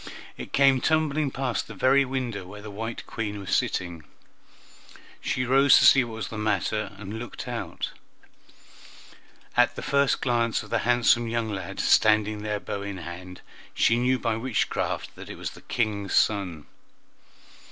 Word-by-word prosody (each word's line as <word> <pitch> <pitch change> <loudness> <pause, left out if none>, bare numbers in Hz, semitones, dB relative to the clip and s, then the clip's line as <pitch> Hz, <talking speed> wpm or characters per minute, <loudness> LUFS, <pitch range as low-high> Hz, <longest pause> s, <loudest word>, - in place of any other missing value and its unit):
It - - -8
came 135 -2 +4
tumbling 155 -2 +1
past 130 -2 -2
the 115 - -9
very 135 +7 +4
window 125 -6 -3
where 105 +2 -10
the 110 - -8
white 115 +3 -5
Queen 105 -2 -4
was 100 - -1
sitting; 85 -3 -2 1.2
she 125 - -1
rose 135 +2 +6
to - - +5
see 130 - +7
what 115 -2 -7
was 110 -4 -4
the 110 - -6
matter, 105 0 -1
and 105 +2 -6
looked 120 -2 -7
out. - - -4 1.6
At 125 0 +4
the - - -6
first 140 -1 +2
glance 115 -3 0
of 105 - -14
the - - +2
handsome 120 -1 +4
young 115 -1 -1
lad 95 -2 -5
standing 110 -1 +3
there 105 -1 -2
bow 100 - -5
in 100 -1 -5
hand, 90 +1 -9 0.3
she 115 +1 +3
knew 130 +1 +2
by 115 -3 -1
witchcraft 120 0 -2
that - - -11
it - - -6
was - - -5
the - - -14
King's 105 -5 -2
son. 90 -8 +1
115 Hz, 165 wpm, -26 LUFS, 100-125 Hz, 1.6 s, see